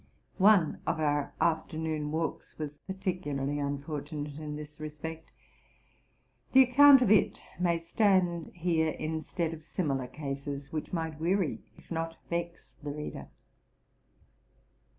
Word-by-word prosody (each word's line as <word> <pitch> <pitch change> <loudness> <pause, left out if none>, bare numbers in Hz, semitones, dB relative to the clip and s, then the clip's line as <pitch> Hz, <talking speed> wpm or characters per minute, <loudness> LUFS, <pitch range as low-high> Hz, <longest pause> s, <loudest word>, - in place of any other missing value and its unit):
One 190 -5 +5
of - - 0
our 145 -2 +1
afternoon 160 -2 0
walks 160 +1 -3
was.particularly 145 -2 -3
unfortunate 145 +1 -4
in 150 -1 -5
this 150 0 -9
respect: 155 +1 -7 1.2
the 265 0 +9
account 270 +1 +8
of 210 - +2
it 215 - +3 0.2
may 175 -2 +2
stand 175 -1 +2
here 165 -3 +1
instead 160 +2 -2
of 160 - -8
simi 155 -2 -2
lar 130 -2 -2
cases, 140 +1 -5
which 155 - -3
might 160 -3 -3
weary 175 0 0 0.2
if - - -19
not 165 0 -3
vex 170 0 -4
the 145 - -5
reader. 150 +1 -6
160 Hz, 120 wpm, -30 LUFS, 150-175 Hz, 1.2 s, the